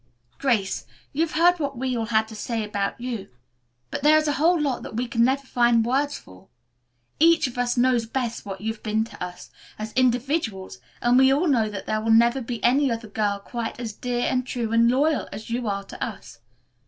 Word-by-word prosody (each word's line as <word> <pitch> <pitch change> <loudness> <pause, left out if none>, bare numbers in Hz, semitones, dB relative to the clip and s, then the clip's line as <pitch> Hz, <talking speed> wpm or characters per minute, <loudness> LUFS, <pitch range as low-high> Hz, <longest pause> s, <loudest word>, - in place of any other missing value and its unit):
"Grace, 225 -8 0 0.3
you've 320 +3 0
heard 350 +2 +4
what 280 -3 -3
we 255 0 -1
all 225 -2 -2
had 220 -1 +2
to 220 - -10
say 225 +1 -3
about 205 0 -3
you, 235 -5 -5 0.6
but - - -3
there 300 +2 +6
is 310 0 +1
a - - +2
whole 340 +2 +4
lot 280 -4 -1
that - - -8
we 245 +2 -1
can 230 -1 +1
never 270 +3 +1
find 240 -3 +3
words 280 +4 0
for. 95 0 -16 0.7
Each 330 0 +5
of 250 - -4
us 245 0 0
knows 245 -2 +2
best 240 -1 -3
what 195 -1 -7
you've 220 +1 -4
been 220 0 0
to 210 -4 -8
us, 180 0 -8 0.3
as 215 0 -6
individuals, 245 - 0 0.2
and 240 +1 +5
we 265 0 +6
all 290 +6 +2
know 230 -7 +2
that 200 -2 -6
there 215 0 -1
will 225 - -2
never 235 +4 +4
be 235 -1 -5
any 270 +2 +3
other 230 -1 -4
girl 205 -1 -1
quite 230 +3 -5
as 230 -3 -4
dear, 245 +3 -3
and 255 0 0
true, 235 -4 -3
and 230 +1 +5
loyal 285 +4 +1
as 220 - -8
you 240 0 -2
are 200 -1 -2
to - - -7
us. 195 - -7
240 Hz, 215 wpm, -24 LUFS, 220-265 Hz, 0.7 s, there